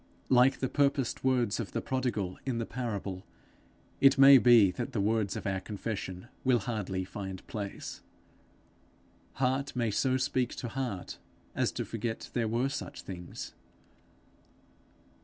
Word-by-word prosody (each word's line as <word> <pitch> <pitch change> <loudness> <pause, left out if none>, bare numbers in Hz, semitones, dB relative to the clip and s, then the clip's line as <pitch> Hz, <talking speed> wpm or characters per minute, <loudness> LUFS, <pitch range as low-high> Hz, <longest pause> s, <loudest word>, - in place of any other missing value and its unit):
Like 130 +1 +5
the 130 - +1
purposed 140 -2 +1
words 125 -5 +2
of 115 - -4
the - - 0
prodigal 120 -8 -2
in 130 -3 -2
the 115 - -1
parable, 100 -6 -4 0.8
it 135 0 +6
may 135 0 +9
be 115 -6 +6
that 120 +6 -5
the 110 - -1
words 105 -1 +1
of - - -5
our 95 -1 0
confession 100 -1 -5 0.2
will 130 -2 +4
hardly 100 -4 -3
find 95 -1 -7
place. 100 -2 -6 1.3
Heart 135 +2 0
may 120 -3 0
so 130 +5 +2
speak 130 -1 0
to 120 - -5
heart 120 -7 -4 0.3
as - - +1
to - - -3
forget 115 0 -4
there 115 -2 0
were 120 +4 +1
such 140 - -6
things. 90 -2 -7
115 Hz, 140 wpm, -30 LUFS, 100-130 Hz, 1.3 s, may